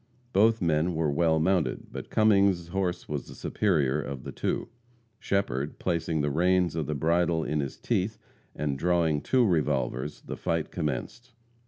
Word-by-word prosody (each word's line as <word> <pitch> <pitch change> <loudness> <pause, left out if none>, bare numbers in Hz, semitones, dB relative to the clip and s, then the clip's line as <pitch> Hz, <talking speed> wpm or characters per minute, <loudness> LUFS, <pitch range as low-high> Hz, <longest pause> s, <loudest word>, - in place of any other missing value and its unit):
Both 110 +1 +4
men 80 +1 +1
were 80 -2 +1
well 80 +2 +2
mounted, 85 0 0
but - - -7
Cummings' 100 -5 +3
horse 95 -1 -2
was 75 -3 -4
the - - -11
superior 75 -8 +1
one 70 - -6
of 65 -2 -6
the - - -6
two. - - -2 0.5
Shepherd, 75 -8 -1
placing 85 -3 -1
the 75 0 0
reins 90 +3 +2
of 80 -3 -2
the 75 - -2
bridle 85 +2 +1
in 75 0 -1
his 70 -2 -3
teeth, 110 -1 -1 0.4
and 70 -2 -2
drawing 85 -3 +2
two 130 -2 +3
revolvers, 75 - 0
the - - -7
fight 80 -2 -2
commenced. 90 - -4
80 Hz, 165 wpm, -28 LUFS, 75-95 Hz, 0.5 s, Both